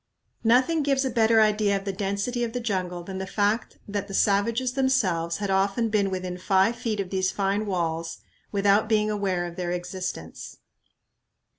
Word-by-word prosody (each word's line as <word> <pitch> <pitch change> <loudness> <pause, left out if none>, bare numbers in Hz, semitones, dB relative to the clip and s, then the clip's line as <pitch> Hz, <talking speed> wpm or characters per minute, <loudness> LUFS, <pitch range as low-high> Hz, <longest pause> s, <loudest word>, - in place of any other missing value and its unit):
Nothing 255 +8 +3
gives 275 -1 +1
a 260 - -1
better 225 -1 +4
idea 210 -2 +3
of 195 - -8
the 195 - -2
density 200 +5 -2
of 230 -1 -3
the 245 - -2
jungle 185 -6 -2
than 190 +1 -6
the 190 - -4
fact 205 +3 0
that 200 -1 -3
the 195 - -5
savages 230 +6 +2
themselves 195 -12 +1
had 200 -2 -2
often 200 +4 +1
been 205 -2 +1
within 185 -1 -4
five 190 +4 +2
feet 220 -3 -3
of 190 -2 -3
these 190 -1 +1
fine 200 +2 -1
walls 165 -3 -2 0.3
without 205 +1 +3
being 215 -1 +2
aware 190 -4 -1
of 175 0 -8
their 180 -1 -2
existence. 180 - -5
200 Hz, 175 wpm, -25 LUFS, 185-225 Hz, 0.3 s, better